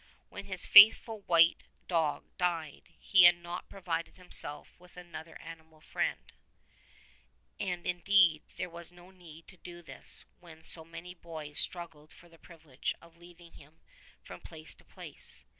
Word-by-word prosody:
When - - -9
his - - -3
faithful 220 +1 +7
white 165 -1 +4 0.2
dog 160 -4 -1 0.2
died 170 -4 -3
he 185 -3 +5
had 175 0 +7
not 175 +1 -8
provided 170 -4 -5
himself 180 -5 -5
with 180 0 -20
another 170 -2 -11
animal 160 -1 -13
friend, - - -4 1.3
and 180 -3 -4
indeed 175 -3 +3 0.2
there 185 - -4
was 170 0 -5
no 175 +1 -17
need 165 -3 -15
to 185 - -16
do 175 0 -12
this - - -1
when 160 -2 -15
so 160 0 +3
many 170 +2 -10
boys 160 -4 -2
struggled 165 -4 0
for 175 - -18
the 165 -1 -20
privilege 155 -6 -7
of 170 0 -19
leading 175 0 -17
him 150 +3 -18 0.4
from - - -12
place - - -9
to - - -16
place. - - -14
170 Hz, 150 wpm, -30 LUFS, 160-180 Hz, 1.3 s, faithful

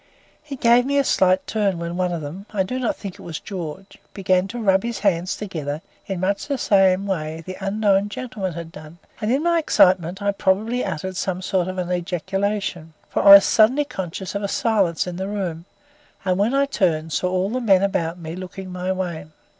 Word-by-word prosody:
It 275 -3 -6
gave 240 +1 +5
me 280 0 +1
a 280 - +4
slight 185 -6 +2
turn 205 -4 0
when 170 0 -4
one 180 0 0
of 170 -2 -3
them 175 +8 -8
I 200 -3 +1
do 250 +7 -4
not 245 - -1
think 195 -3 -7
it - - -15
was 165 -2 -6
George 185 -1 -7 0.2
began 185 -1 +1
to 235 +5 -7
rub 195 -4 +3
his 235 +1 -3
hands 185 -3 +1
together 155 -7 -5 0.2
in 195 -2 -3
much 200 +2 -1
the 195 -8 +3
way 160 -4 -3
the 185 - -6
unknown 200 0 +2
gentleman 210 -6 -4
had 165 0 -7
done, 155 +1 -12 0.2
and, 215 +1 0
in 275 +4 +1
my 340 0 +3
excitement, 185 - +3
I 200 0 +1
probably 205 +5 0
uttered 185 +4 -4
some 185 -1 -2
sort 185 -1 0
of 185 0 -5
an 180 -1 -2
ejaculation, 180 -1 -2 0.2
for - - 0
I 200 0 +9
was 200 - +7
suddenly 255 +7 +4
conscious 190 -5 -5
of 200 - -2
a 200 - -1
silence 200 -6 +1
in 180 -1 -6
the 190 +1 -3
room, 180 -5 -4 0.6
and 185 0 +1
when 225 +6 +2
I 280 0 +3
turned 165 - 0
saw 180 - 0
all 185 +2 0
the 255 +2 -2
men 195 -5 +4
about 170 -3 -1
me 165 -1 -7
looking 185 +1 -8
my 180 +1 -2
way. 180 -5 -4
190 Hz, 210 wpm, -22 LUFS, 175-205 Hz, 0.6 s, I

